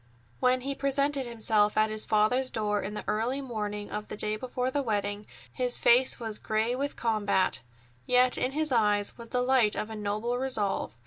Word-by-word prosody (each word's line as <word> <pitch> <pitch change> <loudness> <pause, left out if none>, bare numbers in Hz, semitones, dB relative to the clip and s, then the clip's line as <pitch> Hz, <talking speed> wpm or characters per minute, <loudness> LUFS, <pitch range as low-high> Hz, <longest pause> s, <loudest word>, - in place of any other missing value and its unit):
When 255 0 +2
he 275 +2 -3
presented 275 -1 +1
himself 215 -3 +1
at 215 0 +3
his 215 0 -2
father's 225 +5 +2
door 210 -3 -1
in 210 +2 -5
the - - -5
early 235 +6 -1
morning 210 -5 -5
of 210 0 -5
the - - -7
day 215 0 0
before 250 +2 -3
the 285 - 0
wedding, 205 -3 -2 0.3
his 250 -1 0
face 250 +2 +4
was 220 -3 -5
gray 220 +3 0
with 280 +2 -3
combat, 205 - +1 0.5
yet 250 0 +4
in 255 - 0
his 310 0 -1
eyes 210 -4 +2
was 230 -1 -11
the 250 -1 0
light 250 -5 +3
of 220 - -4
a - - -5
noble 215 +4 -2
resolve. 215 - -2
230 Hz, 190 wpm, -28 LUFS, 210-255 Hz, 0.5 s, face